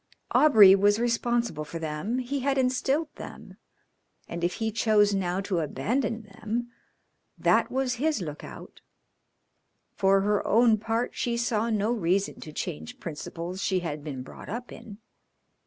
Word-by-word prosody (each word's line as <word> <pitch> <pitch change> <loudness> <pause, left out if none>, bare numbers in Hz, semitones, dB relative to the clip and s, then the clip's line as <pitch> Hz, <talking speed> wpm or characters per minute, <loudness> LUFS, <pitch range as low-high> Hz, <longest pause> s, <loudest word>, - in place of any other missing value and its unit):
Aubrey 215 -11 +8
was 205 +1 +4
responsible 235 -7 0
for 150 +2 -7
them, 160 +9 -3
he 260 +2 -2
had 275 +1 0
instilled 265 +4 0
them, - - -10 0.7
and 170 0 -6
if 175 - 0
he 220 -1 -2
chose 210 -2 +3
now 185 -1 -1
to 190 -3 -1
abandon 220 - -1
them 220 +4 -5 0.7
that - - +3
was 260 -2 -1
his 310 -3 +1
look 150 -5 -6
out. - - -11 1.1
For 195 0 +3
her 205 +1 +1
own 225 -1 +4
part 225 +3 -1
she 235 -1 -1
saw 230 -1 0
no 215 0 +1
reason 195 -3 0
to 155 - -9
change 80 - -6
principles 170 +3 -6
she 190 -2 0
had 150 -4 -5
been 135 -4 -5
brought - - -11
up 240 +4 -5
in. 205 -3 -10
210 Hz, 150 wpm, -27 LUFS, 175-240 Hz, 1.1 s, Aubrey